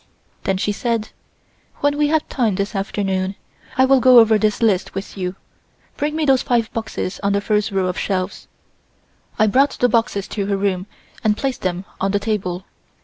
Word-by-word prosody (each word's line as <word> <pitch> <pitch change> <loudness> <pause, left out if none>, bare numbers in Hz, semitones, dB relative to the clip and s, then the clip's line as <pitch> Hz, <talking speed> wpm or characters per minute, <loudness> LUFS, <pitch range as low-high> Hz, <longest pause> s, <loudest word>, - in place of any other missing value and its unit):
Then 190 - +1
she 205 - 0
said: 230 +1 -2 0.7
"When 285 0 +2
we 295 0 +2
have 315 +1 +1
time 230 -7 0
this 200 +1 -2
afternoon, 195 -1 -1 0.4
I 260 - +6
will 270 0 +5
go 255 0 +7
over 225 -2 +6
this 210 -1 +1
list 195 -5 +1
with 195 +1 -5
you. 185 -1 -3 0.6
Bring 300 +1 -2
me 315 -1 0
those 270 -2 +4
five 235 -3 0
boxes 220 -4 -4
on 200 0 +1
the 200 - +2
first 210 +1 0
row 190 -1 +1
of 180 0 -2
shelves." 185 -1 -2 0.9
I 215 - +4
brought 265 +7 +3
the 245 - +4
boxes 225 -4 0
to 200 -2 -3
her 200 -1 0
room 195 -1 -1 0.4
and 215 -1 +2
placed 270 -2 -2
them 185 0 -2
on 195 +1 0
the 205 - +2
table. 195 -3 -2
210 Hz, 190 wpm, -20 LUFS, 195-240 Hz, 0.9 s, go